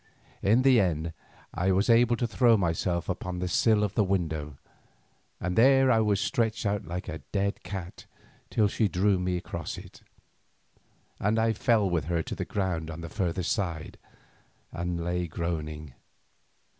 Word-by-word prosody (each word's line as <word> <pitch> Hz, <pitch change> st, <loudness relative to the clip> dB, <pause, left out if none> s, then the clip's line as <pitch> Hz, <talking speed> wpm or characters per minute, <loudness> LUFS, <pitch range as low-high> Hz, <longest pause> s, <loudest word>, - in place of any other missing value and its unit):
In 110 Hz, +6 st, +3 dB
the 130 Hz, -3 st, +6 dB
end 80 Hz, -4 st, 0 dB, 0.4 s
I 90 Hz, +3 st, +1 dB
was 95 Hz, +3 st, +2 dB
able 120 Hz, 0 st, +5 dB
to 120 Hz, -, -1 dB
throw 115 Hz, 0 st, +4 dB
myself 85 Hz, -1 st, -1 dB
upon 90 Hz, 0 st, -3 dB
the 90 Hz, +1 st, -2 dB
sill 105 Hz, +3 st, +3 dB
of 105 Hz, -, -1 dB
the 105 Hz, -, +2 dB
window, 80 Hz, -7 st, -2 dB, 0.8 s
and 90 Hz, 0 st, -2 dB
there 135 Hz, +2 st, +5 dB
I 115 Hz, -, +4 dB
was 105 Hz, -2 st, +2 dB
stretched 110 Hz, 0 st, 0 dB
out 100 Hz, 0 st, -1 dB
like 90 Hz, +2 st, -5 dB
a 80 Hz, -, -5 dB
dead 100 Hz, 0 st, -1 dB
cat 90 Hz, -1 st, -7 dB, 0.4 s
till 105 Hz, -2 st, +2 dB
she 105 Hz, +2 st, +1 dB
drew 95 Hz, 0 st, +2 dB
me 90 Hz, 0 st, -1 dB
across 85 Hz, -2 st, -5 dB
it, -, -, -12 dB, 1.2 s
and 105 Hz, +3 st, +1 dB
I 115 Hz, 0 st, +2 dB
fell 110 Hz, -2 st, +2 dB
with 85 Hz, -6 st, 0 dB
her 85 Hz, 0 st, -1 dB
to -, -, -6 dB
the -, -, -4 dB
ground 90 Hz, -5 st, -2 dB
on 80 Hz, +1 st, -7 dB
the 85 Hz, -, -7 dB
further 90 Hz, -2 st, -2 dB
side, 90 Hz, -, -3 dB, 0.7 s
and 85 Hz, -1 st, -3 dB
lay 90 Hz, 0 st, -1 dB
groaning. 75 Hz, -3 st, -4 dB
95 Hz, 165 wpm, -28 LUFS, 85-110 Hz, 1.2 s, the